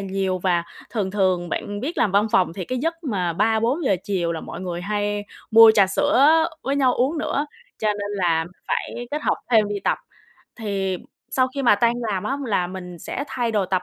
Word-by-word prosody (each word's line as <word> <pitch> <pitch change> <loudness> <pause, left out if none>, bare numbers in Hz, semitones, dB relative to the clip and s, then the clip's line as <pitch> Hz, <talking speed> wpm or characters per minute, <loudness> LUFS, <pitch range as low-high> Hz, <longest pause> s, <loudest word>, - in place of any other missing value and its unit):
nhiều. 190 -1 -1
Và 175 -2 +1 0.3
thường 205 -5 -1
thường, 185 -3 +1
bạn 205 +3 -4
biết 305 +8 -4
làm 200 - +2
văn 205 +2 +4
phòng 185 -7 +3
thì 185 +1 -5
cái 255 +5 -3
giấc 330 +5 -3
mà 185 - -1
3:00-4:00 225 - +1
chiều 175 -4 -1
là 165 - -4
mọi - - -8
người 175 -2 -4
hay 205 +1 -2 0.3
mua 225 0 +9
trà 200 -3 +5
sữa 290 +7 +4 0.2
với 275 +1 -1
nhau 260 -3 +3
uống 275 +6 0
nữa, 300 -1 -1 0.3
cho 215 - 0
nên 205 -1 -2
là 175 -5 +1 0.2
phải 240 0 -3
kết 300 +1 -3
hợp - - +1
thêm 220 -3 +4
đi 205 -1 -3
tập. - - +1 0.6
Thì 195 -4 -2 0.4
sau 255 -1 +2
khi 280 - -2
mà 235 -5 +6
tan 235 +3 +2 0.2
làm 190 -3 -2
á 275 - -1
là 195 -5 +1
mình 180 -1 -8
sẽ 225 - -4
thay 240 -3 -1
đồ 205 -3 +1
tập, 185 -1 0
205 Hz, 210 wpm, -23 LUFS, 185-245 Hz, 0.6 s, mua